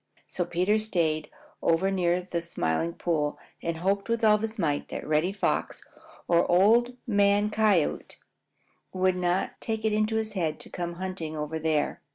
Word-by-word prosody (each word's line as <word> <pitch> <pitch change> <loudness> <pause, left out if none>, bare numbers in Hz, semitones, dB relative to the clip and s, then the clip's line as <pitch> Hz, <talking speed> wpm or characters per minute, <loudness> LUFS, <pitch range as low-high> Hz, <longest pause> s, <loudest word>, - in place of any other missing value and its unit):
So 175 - -3
Peter 185 +6 +1
stayed 165 -8 0 0.3
over 175 +4 +2
near 180 -1 +1
the 175 -2 -3
Smiling 80 - -1
Pool 150 -4 -1 0.2
and 165 -1 -2
hoped 195 +5 -1
with 230 0 0
all 210 -1 +5
his 225 +1 -4
might 150 -7 -1
that - - -6
Reddy 155 +4 +2
Fox 200 - -1 0.4
or 170 -1 +3
Old 230 +7 +4
Man 205 -1 +3
Coyote 210 -7 +1 0.8
would 185 0 +2
not 180 +1 -1
take 220 -1 -3
it 220 - +2
into 215 +1 +1
his 220 -1 -2
head 160 -6 -1
to - - -13
come 175 -1 -4
hunting 175 -4 -5
over 150 +1 -3
there. 155 -2 0
180 Hz, 165 wpm, -27 LUFS, 165-210 Hz, 0.8 s, all